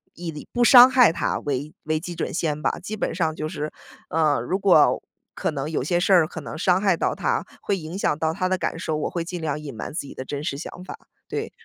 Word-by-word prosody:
以 165 -3 -7
不 245 - +1
伤 245 +1 +9
害 250 -8 +6
他 - - -1
为 145 +2 -3
为 155 0 0
基 175 +2 -6
准 165 - -3
线 155 -3 -1
吧。 - - -1
基 210 +4 -5
本 - - -2
上 160 -3 0
就 155 - -3
是， 155 -1 -4 0.4
呃， 155 -5 +2
如 175 +11 -1
果 185 -6 +5 0.3
可 - - -1
能 145 0 -4
有 160 - -1
些 175 +5 +1
事 185 - +1
儿 170 -4 +6
可 160 - -8
能 - - -7
伤 180 +2 +2
害 195 -4 +3
到 - - 0
他， - - -1 0.2
会 200 - -1
影 165 +1 -7
响 150 - 0
到 160 +1 0
他 185 +1 -1
的 185 - +1
感 175 - -2
受， 160 -3 -2
我 150 - -2
会 170 - -3
尽 175 +1 -6
量 150 -2 -2
隐 145 -5 -8
瞒 110 - -6
自 165 - -2
己 140 - -10
的 130 - -6
真 145 +1 -5
实 140 -3 -3
想 175 +3 -8
法。 - - -8 0.3
对。 - - -3
160 Hz, 275 characters per minute, -24 LUFS, 150-185 Hz, 0.4 s, 伤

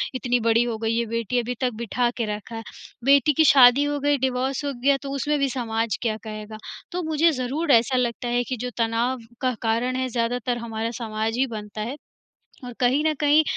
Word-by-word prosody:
इतनी 245 -1 0
बड़ी 230 +1 +3
हो 235 -2 -3
गई 225 +1 -1
है 235 - +1
बेटी 230 +2 -1
अभी 245 +1 -3
तक 250 -1 +1
बिठा 240 +2 0
के 230 - 0
रखा 215 +2 -9
है, 225 - -6 0.4
बेटी 280 +1 +5
की 315 - +4
शादी 260 +1 +7
हो 290 0 -1
गई, 290 0 +2
डिवोर्स 260 +2 -1
हो 280 - -2
गया, 280 0 +4
तो 275 -1 -6
उसमें 295 +3 0
भी 275 -1 +1
समाज 230 -3 -2
क्या 220 -3 -1
कहेगा। 215 0 -7 0.3
तो 360 +1 -2
मुझे 315 +1 +3
ज़रूर 285 +5 -1
ऐसा 240 +2 +4
लगता 240 0 -1
है 245 0 +1
कि 255 0 -4
जो 250 +2 -4
तनाव 235 +2 0 0.2
का 255 -1 +1
कारण 235 +3 0
है 260 0 -1
ज़्यादातर 240 +1 -1
हमारा 230 -1 -4
समाज 220 +1 -2
ही 265 +1 +2
बनता 210 0 -7
है, 250 +7 -4 0.7
और 245 - -7
कहीं 260 +4 +2
न 310 - +3
कहीं 300 +1 +5
245 Hz, 210 wpm, -24 LUFS, 230-270 Hz, 0.7 s, शादी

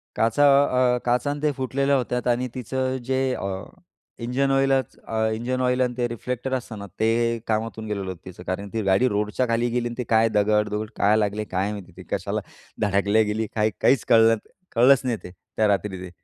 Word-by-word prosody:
काचा 115 +5 +2 0.5
अ, - - 0
काचा 125 +3 +1
आणि 145 0 -5
ते 150 -1 +2
फुटलेल्या 135 +2 +1
होत्यात 125 -1 -1
आणि 125 +1 +1
तिचं 130 +1 -2
जे 130 +1 0
अ, - - -4 0.8
इंजन 135 +3 0
ऑईलच 135 -2 +1
अ, 115 - -7 0.2
इंजन 125 +3 -2
ऑईल 125 0 +1
आणि 125 -1 +1
ते 120 -1 +1
रिफ्लेक्टर 125 +2 -4
असतं 125 -4 -4
ना 100 - -7
ते 115 +1 +1
कामातून 110 0 -2
गेलेलं 100 -2 -3
होतं 90 -1 -9
तिचं. 90 -1 -10
कारण 100 +2 -3
ती 115 - -1
गाडी 100 +5 +3
रोडच्या 105 +3 0
खाली 115 +1 +1
गेली 120 0 -1
आणि 120 - -6
ती 125 - -2
काय 115 0 +4
दगडदुगड 105 0 +1
काय 105 +2 +3
लागले 105 0 0
काय 95 +1 -1
माहिती 100 -3 -8
ते, - - -9
कशाला - - -2 0.4
धडकल्या 100 +1 +2
गेली? 110 +1 -2
काय, 110 0 +2
काहीच 125 -7 +3
कळलं, 115 0 +6 0.4
कळलंच 125 +3 +6
नाही 120 -3 0
ते, 90 - -9 0.3
त्या 110 - +3
रात्री 100 -1 0
ते. 90 - -7
115 Hz, 195 wpm, -24 LUFS, 105-125 Hz, 0.8 s, कळलं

